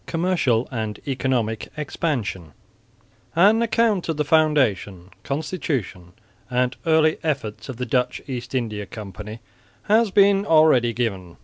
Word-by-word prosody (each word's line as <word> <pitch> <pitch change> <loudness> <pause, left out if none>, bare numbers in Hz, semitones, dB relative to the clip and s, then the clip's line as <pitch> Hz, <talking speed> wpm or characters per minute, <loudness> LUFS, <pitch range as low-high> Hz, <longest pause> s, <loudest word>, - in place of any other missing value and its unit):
COMMERCIAL 165 -9 +1
AND 110 -4 -4
ECONOMIC 125 -5 -1
EXPANSION 120 - -3 0.8
An 205 +7 +5
account 225 -5 +1
of 160 - -1
the 150 - 0
foundation, 125 - +1
constitution 135 - -4 0.4
and 125 0 0
early 160 -1 +3
efforts 110 -7 -3
of 130 - -6
the 125 - -3
Dutch 125 +1 0
East 125 -1 -5
India 105 -5 -3
Company 105 +2 -9 0.4
has 220 +1 +3
been 200 0 +4
already 155 - +4
given. 100 -7 -3
125 Hz, 120 wpm, -22 LUFS, 110-160 Hz, 0.8 s, An